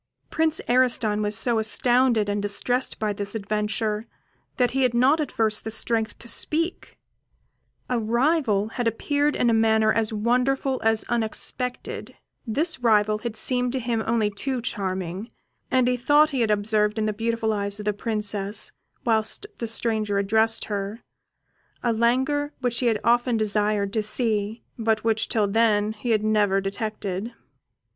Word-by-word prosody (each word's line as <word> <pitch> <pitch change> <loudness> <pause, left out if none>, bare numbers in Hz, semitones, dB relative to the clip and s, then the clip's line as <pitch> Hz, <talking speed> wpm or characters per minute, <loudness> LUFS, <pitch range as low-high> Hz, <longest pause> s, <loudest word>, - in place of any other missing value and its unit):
Prince 320 0 +1
Ariston 240 -4 +2
was 210 0 +2
so 235 -3 +3
astounded 240 0 +2
and 205 0 -1
distressed 245 +5 -1
by 215 -1 -1
this 200 +1 -4
adventure, 210 +1 -2 0.5
that 245 -2 +2
he 270 - 0
had 250 -2 +2
not 265 +6 +4
at 300 - -2
first 220 -1 0
the 220 - -4
strength 225 0 -1
to 235 - -9
speak; 330 +8 -1 0.9
a 250 -2 0
rival 230 -2 +1
had 240 0 -2
appeared 290 +6 0
in 245 - +1
a 230 - +3
manner 220 -1 +3
as 225 -1 0
wonderful 250 +4 0
as 225 0 +2
unexpected; 240 +2 0 0.3
this 305 +7 0
rival 215 -3 +2
had 230 -1 -5
seemed 250 +1 +2
to 265 - -1
him 235 -2 -1
only 220 -2 +1
too 255 +6 -2
charming, 190 -3 -3 0.4
and 255 -2 +2
he 250 - +2
thought 295 +5 +4
he 265 -3 -1
had 225 - +1
observed 210 +1 +1
in 215 - 0
the 215 - -1
beautiful 225 0 -1
eyes 200 -1 -2
of 210 - -7
the 210 - +1
Princess, 210 -1 -1 0.3
whilst 220 - +1
the 230 - -3
stranger 220 -2 -1
addressed 220 +3 +2
her, 205 +2 -5 0.8
a 235 - +1
languor 265 +6 +1
which 245 -2 0
he 250 - +1
had 220 -2 +1
often 240 0 +2
desired 210 -1 0
to 220 - +1
see, 215 0 -1 0.2
but 220 -1 0
which 225 -1 0
till 215 -3 +1
then 215 0 +2
he 220 +3 -6
had 215 -2 +2
never 210 -2 +2
detected. 205 +1 -4
225 Hz, 160 wpm, -24 LUFS, 210-245 Hz, 0.9 s, not